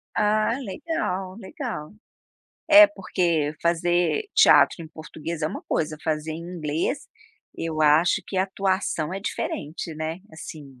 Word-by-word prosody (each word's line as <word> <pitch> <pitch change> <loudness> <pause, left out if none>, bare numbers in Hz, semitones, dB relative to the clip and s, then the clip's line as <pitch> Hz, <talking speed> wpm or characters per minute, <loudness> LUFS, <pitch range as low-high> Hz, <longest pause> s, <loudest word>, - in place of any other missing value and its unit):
Ah 215 +3 +2
legal, 195 - -3
legal. 195 - -6 0.8
É 310 0 +10
porque 170 - -1
fazer 175 - +1
teatro 170 - +6
em 160 - -10
português 155 +1 -7
é 155 - +2
uma - - -6
coisa, 155 -1 -2
fazer 155 -1 -2
em 155 - -6
inglês, 170 - -3 0.5
eu 160 -1 -3
acho 155 +3 +4
que 190 - -5
atuação 190 -3 0
é 195 - -4
diferente, 160 -4 -4
né, 160 +2 -4
assim, 145 -4 -10
170 Hz, 130 wpm, -24 LUFS, 155-195 Hz, 0.8 s, É